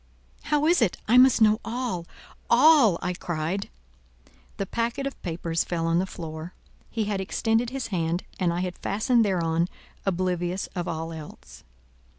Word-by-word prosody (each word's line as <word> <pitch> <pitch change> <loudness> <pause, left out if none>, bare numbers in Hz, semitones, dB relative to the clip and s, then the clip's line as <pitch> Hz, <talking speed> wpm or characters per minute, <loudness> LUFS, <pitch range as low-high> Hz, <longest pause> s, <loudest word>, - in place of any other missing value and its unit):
"How 300 0 +1
is 335 -2 +4
it? 210 -6 +2
I 245 +3 +6
must 255 -3 +6
know 215 0 +4
all—all," 235 - +2
I 180 - -1
cried. 175 +2 -3 0.9
The 195 - -2
packet 235 +6 -2
of 275 - -5
papers 165 -1 -2
fell 165 -2 -2
on 165 +1 +2
the 190 - -1
floor. 160 -1 -7 0.3
He 225 - -1
had 205 -2 -2
extended 225 +4 0
his 265 0 -4
hand, 170 0 0 0.2
and 180 -3 +2
I 175 +1 -1
had 180 -1 -4
fastened 225 +3 +2
thereon, 170 -4 +1 0.4
oblivious 180 -1 -1
of 175 -2 -3
all 165 +1 -4
else. 150 - -11
185 Hz, 155 wpm, -26 LUFS, 170-230 Hz, 0.9 s, I